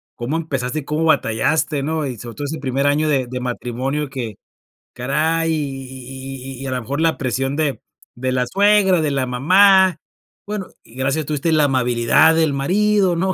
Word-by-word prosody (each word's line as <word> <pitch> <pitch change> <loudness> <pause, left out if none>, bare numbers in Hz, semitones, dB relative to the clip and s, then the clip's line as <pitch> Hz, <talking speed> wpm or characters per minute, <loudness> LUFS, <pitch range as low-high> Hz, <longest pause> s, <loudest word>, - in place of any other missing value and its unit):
cómo 125 +7 -3
empezaste, 140 -3 -3
cómo 155 +3 -1
batallaste, 150 +3 +1
¿no? 155 +1 -2
Y 125 -3 -5
sobre 115 +1 -9
todo 145 - -5
ese 155 +2 -4
primer 135 +2 0
año 150 +2 +2
de 135 -4 +1
de 125 0 -4
matrimonio 125 +3 -3
que 120 -6 -5 0.6
caray, 155 +6 0
y - - +1
y 135 -1 -7
y - - -11
y - - -7
y - - -5
a 130 - -3
lo 125 -1 -2
mejor 140 +6 -4
la 165 0 +2
presión 135 +1 -2
de 150 -3 -1 0.4
de 130 +1 -2
la 125 -1 +1
suegra, 200 -1 +4
de 150 -2 0
la 135 -2 0
mamá, 185 +8 +5 0.5
bueno, 205 -2 -4 0.2
y 115 - -19
gracias 135 +2 0
a - - 0
Dios 140 - -9
tuviste 150 +2 -1
la 155 -2 +4
amabilidad 125 +3 +3
del 160 -2 +2
marido, 190 +6 +2
¿no? 185 +2 0
140 Hz, 200 wpm, -20 LUFS, 130-160 Hz, 0.6 s, mamá